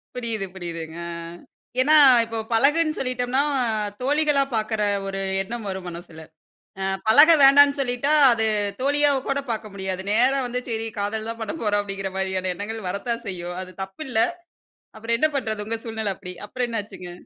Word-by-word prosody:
புரியுது 230 Hz, -5 st, -3 dB
புரியுதுங்க, 165 Hz, -2 st, -7 dB
ஆ. -, -, -5 dB, 0.7 s
ஏன்னா, 305 Hz, +4 st, +5 dB, 0.3 s
இப்ப 225 Hz, -1 st, -4 dB
பழகுன்னு 310 Hz, +6 st, +3 dB
சொல்லிட்டம்ன்னா 255 Hz, +1 st, 0 dB, 0.6 s
தோழிகளா 295 Hz, 0 st, +2 dB
பாக்குற 215 Hz, 0 st, -1 dB, 0.2 s
ஒரு 195 Hz, 0 st, -4 dB, 0.2 s
எண்ணம் 225 Hz, +1 st, -6 dB
வரும் 190 Hz, -1 st, -5 dB
மனசுல. 170 Hz, -2 st, -9 dB, 0.6 s
அ. -, -, -1 dB, 0.2 s
பழக 290 Hz, +9 st, +8 dB
வேண்டான்னு 280 Hz, +1 st, +7 dB
சொல்லிட்டா, 245 Hz, +3 st, -1 dB, 0.2 s
அது 225 Hz, -1 st, 0 dB, 0.4 s
தோழியா 290 Hz, +1 st, +3 dB, 0.2 s
கூட 275 Hz, -, +1 dB
பாக்க 220 Hz, -1 st, -4 dB
முடியாது. 190 Hz, -1 st, -3 dB
நேரா 250 Hz, +5 st, +3 dB
வந்து, 250 Hz, +1 st, -3 dB
"சரி 225 Hz, 0 st, -3 dB
காதல் 215 Hz, +2 st, -3 dB
தான் 230 Hz, -, -6 dB
பண்ணப்போறோம்" 215 Hz, -6 st, -1 dB
அப்படிங்கிற 195 Hz, -1 st, -5 dB
மாரியான 190 Hz, -1 st, -1 dB
எண்ணங்கள் 215 Hz, +1 st, -6 dB
வரத்தான் 230 Hz, +5 st, -3 dB
செய்யும். 175 Hz, -1 st, -5 dB
அது 185 Hz, 0 st, -13 dB
தப்பில்ல! 220 Hz, +5 st, -4 dB, 0.8 s
அப்புறம் 225 Hz, +1 st, -1 dB
என்னா 310 Hz, +4 st, +2 dB
பண்றது? 220 Hz, -4 st, -3 dB
உங்க 225 Hz, +1 st, -3 dB
சூழ்நிலை 220 Hz, -2 st, -3 dB
அப்படி. 180 Hz, -, -9 dB, 0.2 s
அப்புறம் 250 Hz, +2 st, -2 dB
என்னாச்சுங்க? 200 Hz, -5 st, -6 dB
225 Hz, 150 wpm, -23 LUFS, 195-255 Hz, 0.8 s, பழக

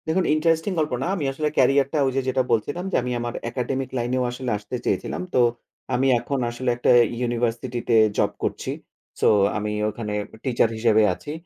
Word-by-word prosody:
দেখুন 175 Hz, +4 st, +1 dB
ইন্টারেস্টিং 165 Hz, +4 st, +1 dB
গল্প 155 Hz, -1 st, 0 dB
না -, -, -1 dB
আমি 155 Hz, -7 st, -2 dB
আসলে 150 Hz, +3 st, -1 dB
ক্যারিয়ারটা 135 Hz, +2 st, +3 dB
ঐযে 135 Hz, +1 st, 0 dB
যেটা 130 Hz, 0 st, +1 dB
বলছিলাম 145 Hz, -, 0 dB
যে -, -, -1 dB
আমি 125 Hz, -, -3 dB
আমার 120 Hz, 0 st, -3 dB, 0.2 s
একাডেমিক 130 Hz, +1 st, -3 dB
লাইনেও 125 Hz, +1 st, 0 dB
আসলে 125 Hz, 0 st, -4 dB
আসতে 105 Hz, +4 st, -7 dB
চেয়েছিলাম। -, -, -1 dB
তো -, -, +3 dB, 0.5 s
আমি 130 Hz, +2 st, +2 dB
এখন 140 Hz, +3 st, -3 dB
আসলে 120 Hz, +2 st, -3 dB
একটা 120 Hz, -, +3 dB, 0.3 s
ইউনিভার্সিটিতে 120 Hz, 0 st, -1 dB, 0.2 s
জব -, -, +2 dB
করছি। -, -, -2 dB, 0.5 s
সো -, -, +4 dB, 0.3 s
আমি 105 Hz, 0 st, -2 dB, 0.2 s
ওখানে 105 Hz, 0 st, -5 dB
একটা 110 Hz, -, -15 dB
টিচার 120 Hz, -3 st, +2 dB
হিসেবে 110 Hz, -1 st, +4 dB
আছি। 145 Hz, -, -8 dB
125 Hz, 175 wpm, -23 LUFS, 120-140 Hz, 0.5 s, সো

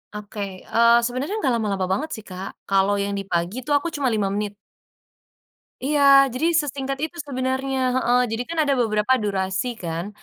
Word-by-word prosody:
Oke, 210 Hz, 0 st, -8 dB, 0.2 s
eee, 235 Hz, +1 st, +4 dB
sebenernya 255 Hz, -, -2 dB
nggak 265 Hz, -, +3 dB
lama-lama 200 Hz, -3 st, -1 dB
banget 305 Hz, +11 st, -1 dB
sih, 220 Hz, -, -10 dB
Kak, 190 Hz, 0 st, -8 dB
kalo 195 Hz, +1 st, +2 dB
yang 200 Hz, 0 st, -1 dB
di 195 Hz, -, -7 dB
pagi 175 Hz, +7 st, -1 dB
tuh 290 Hz, +3 st, 0 dB
aku 305 Hz, +4 st, 0 dB
cuma 285 Hz, -3 st, -1 dB
5 210 Hz, -5 st, 0 dB
menit. 205 Hz, 0 st, -3 dB, 1.3 s
Iya, 295 Hz, 0 st, +1 dB, 0.3 s
jadi 260 Hz, +6 st, 0 dB
sesingkat 275 Hz, -1 st, -4 dB
itu 340 Hz, +2 st, -10 dB
sebenernya 265 Hz, 0 st, -2 dB, 0.2 s
heeh, 250 Hz, -1 st, +3 dB
jadi 225 Hz, +2 st, -2 dB
kan 335 Hz, -, -4 dB
ada 285 Hz, -, +2 dB
beberapa 215 Hz, +2 st, +2 dB
durasi 195 Hz, +4 st, -2 dB
kan, 170 Hz, +1 st, -4 dB
235 Hz, 170 wpm, -23 LUFS, 200-270 Hz, 1.3 s, eee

